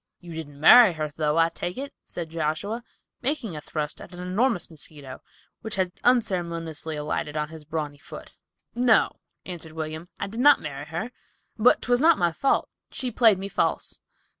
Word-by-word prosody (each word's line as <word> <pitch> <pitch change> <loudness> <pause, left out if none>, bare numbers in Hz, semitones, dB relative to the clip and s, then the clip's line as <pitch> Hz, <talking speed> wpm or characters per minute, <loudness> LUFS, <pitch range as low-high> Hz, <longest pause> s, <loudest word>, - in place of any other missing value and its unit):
"You 175 -1 -10
didn't 145 -3 -8
marry 220 +5 +9
her, 155 -1 -3
though, 150 0 0
I 165 0 +4
take 175 +3 -5
it," 280 +2 -5
said 165 -2 -6
Joshua, 165 +9 -2 0.4
making 250 - -1
a 150 - -6
thrust 150 0 -4
at - - -11
an 175 - -10
enormous 190 +3 0
mosquito, 145 -4 -9 0.4
which 220 -1 -4
had 185 -2 0
unceremoniously 170 -9 0
alighted 150 0 -3
upon 150 0 -1
his 160 -1 -11
brawny 150 -2 -4
foot. - - -11 0.4
"No," 240 -2 +3 0.3
answered 165 -3 -8
William, 160 +2 -5
"I - - -1
did 220 +4 -7
not 290 +2 +7
marry 145 -1 -6
her, 170 +10 -4 0.4
but 230 +3 +4
'twas 245 +1 +2
not 330 0 +6
my 175 -1 +2
fault. 270 +12 +1 0.2
She 250 -2 -3
played 225 -3 +5
me 195 +1 -4
false. - - -1
170 Hz, 175 wpm, -25 LUFS, 155-225 Hz, 0.4 s, marry